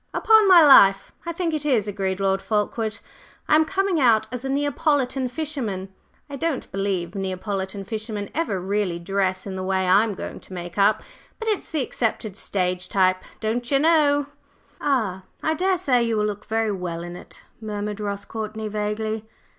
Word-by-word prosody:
"Upon 440 -2 +5
my 350 -4 +8
life, 195 -8 +7 0.2
I - - 0
think 335 -1 -2
it 305 -1 -1
is!" 245 -8 +2
agreed 195 -2 -2
Lord 195 0 +1
Fulkeward. 215 +1 -1 0.5
"I - - +2
am 315 +1 +5
coming 385 0 0
out 225 -4 +4
as 250 0 -4
a 270 - -3
Neapolitan 280 -2 0
fisherman! 245 -10 -4 0.4
I 285 -1 -7
don't 315 -1 -2
believe 195 -3 -2
Neapolitan 195 0 -3
fishermen 215 -1 -5
ever 265 - -1
really 190 -1 -1
dress 185 +1 -1
in 195 -2 -5
the 185 - -4
way 190 0 0
I'm 200 +3 +4
going - - -7
to - - -13
make 175 0 -6
up, 210 +2 +3 0.3
but 450 - -6
it's 420 - -2
the 310 -5 -1
accepted 220 -5 -2
stage 180 -3 -2
type, 185 -1 +2 0.2
don'cher 240 +5 0
know." 290 -2 +3 0.6
"Ah! 220 -10 0 0.2
I 315 - +2
daresay 345 -7 +2
you 230 -2 0
will 210 - +1
look 205 -1 -4
very 225 -1 0
well 175 -3 -4
in 175 0 -7
it," - - -13 0.2
murmured 210 -1 -4
Ross 200 -1 -4
Courtney, 220 -1 -5
vaguely. 215 +1 -3
215 Hz, 170 wpm, -23 LUFS, 195-275 Hz, 0.6 s, my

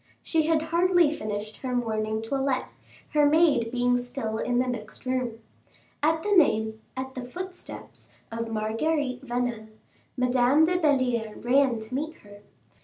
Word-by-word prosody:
She 320 -2 +1
had 320 -1 +2
hardly 340 0 +3
finished 215 -5 -4
her 255 -2 -3
morning 220 -2 -1
toilette, 265 +2 -1 0.4
her 300 -2 +3
maid 290 -7 +3
being 245 0 +2
still 245 -3 -4
in 245 -1 0
the 250 - +3
next 245 0 -6
room. 255 -3 -1 0.6
At 320 +2 +2
the 415 - -1
name 220 - +3 0.2
at 265 0 -4
the 255 - -5
footsteps 365 +9 -8 0.2
of 230 0 -3
Marguerite 250 +5 -1
Vanel, 240 -3 -2 0.5
Madame 250 +4 +4
de 360 +2 +1
Belliere 250 -8 +1
ran 260 -1 +4
to 220 +3 -9
meet 310 +5 -2
her. 205 0 -14
250 Hz, 145 wpm, -27 LUFS, 225-300 Hz, 0.6 s, Madame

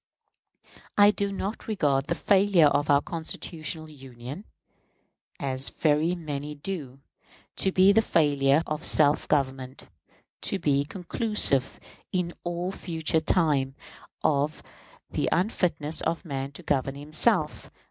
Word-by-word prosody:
I 205 0 +7
do 200 -1 -2
not 200 +2 -5
regard 145 -10 +1
the 170 - 0
failure 195 -4 +4
of 145 0 +2
our 140 0 +4
constitutional 160 -1 -5
Union, 135 - -10 0.9
as 135 -1 0
very 155 +3 +1
many 150 -3 -5
do, 145 -5 -6 0.6
to 190 - +2
be 190 +1 +5
the 225 +2 +4
failure 145 -5 +2
of 155 +1 -4
self 150 -3 +3
government 135 -2 -2 0.5
to - - 0
be 140 -5 +1
conclusive 180 - +1 0.3
in 180 -2 -1
all 175 +1 -3
future 165 -4 -2
time 145 -5 +1 0.5
of 145 +1 0 0.5
the - - 0
unfitness 170 -5 0
of 165 +2 -2
man 135 -3 -4
to - - -11
govern 135 -1 -1
himself. 150 +2 0
155 Hz, 120 wpm, -26 LUFS, 140-180 Hz, 0.9 s, I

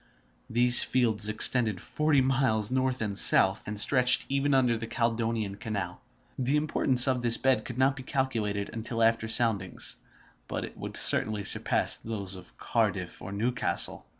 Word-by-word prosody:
These 120 +1 +7
fields 110 -4 0
extended 110 -2 +1
forty 150 +6 -1
miles 130 -5 -1
north 130 -2 -2
and 100 -2 -5
south, 95 -1 +3
and 105 0 -4
stretched 125 +2 +4
even 140 +1 0
under 125 -3 +1
the 115 0 -7
Caledonian 115 -4 -3
Canal. 100 -5 -6 0.4
The 130 +3 0
importance 140 -4 +2
of 130 -2 -1
this 120 -1 +1
bed 130 -1 0
could 125 - -9
not 135 +1 +1
be 135 - -9
calculated 115 -7 -4
until 115 0 -4
after 115 0 0
soundings, 110 -5 0 0.5
but - - -5
it - - -13
would - - -7
certainly 105 -2 +3
surpass - - +2
those 100 -4 -7
of 90 -1 -15
Cardiff - - -3
and 100 +2 -8
Newcastle. 120 -4 -1
115 Hz, 155 wpm, -27 LUFS, 105-130 Hz, 0.5 s, These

